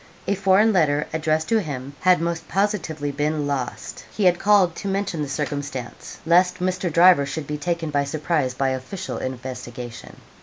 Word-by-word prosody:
A - - +2
foreign 200 +3 +4
letter, 150 -5 +2
addressed 155 0 0
to 225 - +4
him, 140 -5 -6
had 185 -1 +4
most 170 -1 -2
positively 165 -8 -1
been 150 +1 -1
lost. 135 -3 -4
He 210 - -3
had 175 -1 +4
called 200 -5 +4
to 200 - -5
mention 195 -4 -1
the 145 - -3
circumstance, 140 -3 -5
lest 180 +2 +4
Mr. 185 -1 -1
Driver 170 -3 +6
should 155 +1 -4
be 150 +1 -4
taken 170 -1 -2
by 145 -1 +1
surprise 145 -3 -1
by 135 +1 +1
official 130 +9 -5
investigation. 125 -2 -7
155 Hz, 165 wpm, -23 LUFS, 140-180 Hz, -, Driver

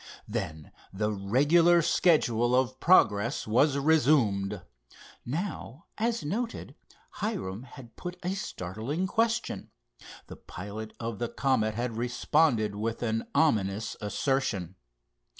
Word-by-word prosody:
Then 80 -1 -5 0.2
the 105 +2 -1
regular 145 - +4
schedule 125 -9 +3
of 130 0 +1
progress 105 - +3
was 135 +6 +3
resumed. 120 - +2 0.6
Now, 155 - -5
as 230 -6 -1
noted, 225 +9 -3 0.5
Hiram 175 - -3
had 125 -2 -13
put 180 0 -7
a 180 +2 -1
startling 120 - -4
question. 225 +3 -1 0.6
The - - -11
pilot 105 +4 -8
of 115 -2 -4
the 120 -1 -2
Comet 120 -3 0
had 120 -1 -3
responded 120 -1 +1
with 115 +3 -3
an 115 -1 -1
ominous 105 -8 +1
assertion. 105 - -1
120 Hz, 110 wpm, -28 LUFS, 105-160 Hz, 0.6 s, regular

